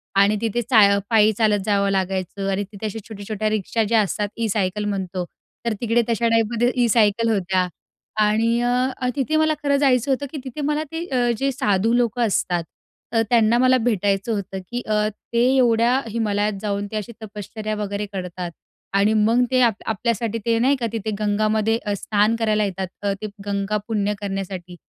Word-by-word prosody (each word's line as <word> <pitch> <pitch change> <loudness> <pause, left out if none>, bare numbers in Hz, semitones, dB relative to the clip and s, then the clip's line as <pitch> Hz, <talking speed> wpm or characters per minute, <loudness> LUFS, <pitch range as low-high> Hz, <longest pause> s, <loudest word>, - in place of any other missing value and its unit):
आणि 200 +2 +4
तिथे 230 +1 0
चा 230 -1 +4 0.3
पायी 220 -1 +5
चालत 210 -1 +2
जावं 200 -1 +2
लागायचं 190 0 -2
आणि 195 +1 -1
तिथे 210 +1 -7
अशा 215 +1 -4
छोट्या-छोट्या 215 0 -3
रिक्षा 215 +2 0
ज्या 225 +1 +2
असतात 205 0 -2
ई 230 - 0
सायकल 205 0 -1
म्हणतो. 190 -3 -3 0.4
तर 230 - +1
तिकडे 235 0 +2
तशा 230 0 +1
टाईपमध्ये 230 +2 +2
ई 235 - +3
सायकल 225 0 +3
होत्या 185 -3 +1 0.5
आणि 225 +3 +2
अ, 250 +1 0
तिथे 285 +3 0
मला 315 0 +3
खरं 280 -1 +3
जायचं 270 -1 +2
होतं 275 +2 0
की 305 - -6
तिथे 265 +3 -6
मला 300 +1 0
ते 325 +1 -4
अ, 245 -4 +1
जे 275 +2 0
साधू 215 -2 +1
लोकं 240 0 +1
असतात 175 -3 0 0.5
अ, 225 - +2
त्यांना 230 -1 +4
मला 255 +1 +4
भेटायचं 200 -1 +1
होतं 195 -2 -4
की 245 +1 -2
अ, 210 0 +2 0.3
ते 235 +1 +3
एवढ्या 240 +1 +3
हिमालयात 210 -2 0
जाऊन 205 -1 -2
ते - - -5
अशी 215 +2 -5
तपश्चर्या 215 +1 -5
वगैरे 205 0 -3
करतात. 180 -2 -5 0.4
आणि 200 +2 +3
मग 225 +3 +3
ते 255 - +3
आ 240 - +6 0.2
आपल्यासाठी 230 +1 -1
ते 230 -1 +2
नाही 265 +4 +3
का 245 -3 -3
तिथे 220 -1 -3
गंगामध्ये 215 +1 +1 0.2
स्नान 210 +3 +1
करायला 215 -2 +1
येतात. 190 -1 -3
अ, 200 -1 0
ते 215 - -3 0.2
गंगा 200 +1 -1
पुण्य 210 -2 0
करण्यासाठी. 195 -3 -5
215 Hz, 180 wpm, -22 LUFS, 200-235 Hz, 0.5 s, आ